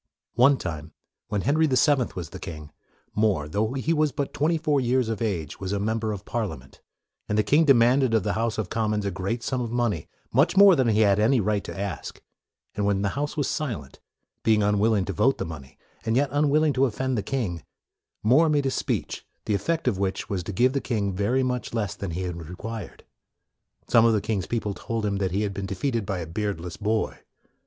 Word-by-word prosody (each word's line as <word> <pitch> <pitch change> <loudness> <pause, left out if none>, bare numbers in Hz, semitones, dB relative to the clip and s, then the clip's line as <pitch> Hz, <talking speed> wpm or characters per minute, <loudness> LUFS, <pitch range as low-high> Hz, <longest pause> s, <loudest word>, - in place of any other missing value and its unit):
One 135 +4 +5
time, 80 -5 -6 0.3
while 105 -2 -1
Henry 155 - +2
the 130 -3 +1
Seventh 140 -5 +2
was 85 -4 -6
the - - -8
king, 75 -3 -8 0.4
More, 105 -9 +1
though 110 +9 -1
he 135 +5 0
was 155 -2 +2
but 140 +2 -3
twenty 160 +3 +1
four 150 -3 +1
years 125 -1 +1
of 110 -1 -3
age, 85 -10 -2
was 95 -1 -4
a 100 - 0
member 110 +1 -1
of 105 -1 -6
Parlia 105 -9 -2
ment; 65 +1 -18 0.5
and 105 - +1
the 105 - +4
king 150 +10 +4
demanded 130 -2 +4
of 110 - +2
the - - 0
House 115 -1 -1
of 105 -5 -3
Commons 105 -2 0
a 100 - -1
great 100 +6 -3
sum 130 +1 -1
of 120 - -3
money, 115 -8 -1 0.3
much 140 +10 +3
more 200 -2 +9
than 130 -5 +2
he 110 -1 +3
had 100 -1 +4
any 120 +4 +4
right 105 -1 0
to - - -7
ask; 95 -7 -5 0.5
and 105 - -2
when 100 -1 +1
the 100 - +1
House 145 +6 -3
was 145 - +1
silent, 115 - -4 0.4
being 110 -2 +3
unwilling 105 0 +2
to 95 - -3
vote 135 +10 +2
the - - -3
money, 75 -5 -9 0.3
and 110 - 0
yet 140 +2 +1
un 145 0 +2
willing 155 +1 +3
to 135 +1 +3
offend 130 +1 -1
the 105 - 0
king, 100 - -3 0.6
More 140 +9 +5
made 145 -2 +2
a 135 - +1
speech - - -2 0.2
the 105 - 0
effect 160 - -1
of 105 -7 +1
which 95 -1 -2
was 95 -3 -2
to - - -4
give 125 +6 +2
the 140 - 0
king 100 -5 -1
very 110 +8 +1
much 125 -2 -2
less 105 -3 -1
than 100 -2 -5
he 85 +3 -3
had 90 -2 -4
re 85 +2 -8
quired. 110 +2 -7 0.8
Some 115 0 +5
of 115 - +4
the 110 - +3
king's 100 -4 -2
people 110 -4 -2
told 115 +1 -3
him 100 -1 0
that 95 -1 0
he 100 +4 -1
had 100 -1 -2
been 95 0 -4
defeated 115 +1 -2
by 100 -2 -1
a 85 - -4
beard 100 +2 -3
less 85 0 -7
boy. 110 +1 -1
110 Hz, 230 wpm, -25 LUFS, 100-130 Hz, 0.8 s, more